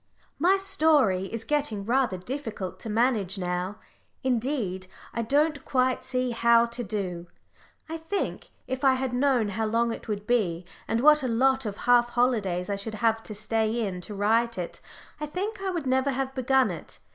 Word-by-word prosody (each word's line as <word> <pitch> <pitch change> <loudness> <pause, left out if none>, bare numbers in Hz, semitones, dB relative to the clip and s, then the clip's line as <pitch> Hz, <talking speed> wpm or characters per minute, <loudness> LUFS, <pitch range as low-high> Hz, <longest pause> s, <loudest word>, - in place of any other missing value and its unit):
_ - - -33 0.2
My 365 +5 +4
story 310 - +2
is 225 +3 -5
getting 230 -7 -1
rather 245 -4 +1
difficult 220 -2 -5
to 225 - -7
manage 215 -4 +1
now. 180 +2 -2 0.5
Indeed, 235 -7 -1 0.3
I 235 - -1
don't 285 +5 +1
quite 255 -1 +1
see 255 -1 -1
how 235 0 +4
to 235 +1 -5
do. 185 -5 -4 0.6
I 325 +1 -4
think, 325 +5 -3 0.2
if 260 +2 -4
I 265 -1 +5
had 260 -1 -2
known 250 -4 +2
how 220 +2 -1
long 230 +1 +1
it - - -9
would 205 -1 -3
be, 185 -8 0 0.2
and 230 - 0
what 300 +2 +6
a 260 - -1
lot 260 +1 +2
of 205 0 -5
half 240 -1 +5
holidays 215 -8 +1
I 200 - -1
should 215 +2 -4
have 225 +1 +1
to 215 - -7
stay 220 +2 0
in 180 -3 -4
to 210 +3 -6
write 225 +3 +2
it, 175 -2 -5 0.4
I 300 - -3
think 385 +7 -4
I 390 - -1
would 340 -5 -3
never 260 +1 +2
have 270 0 -2
begun 265 0 +2
it. - - -9
235 Hz, 185 wpm, -27 LUFS, 210-265 Hz, 0.6 s, what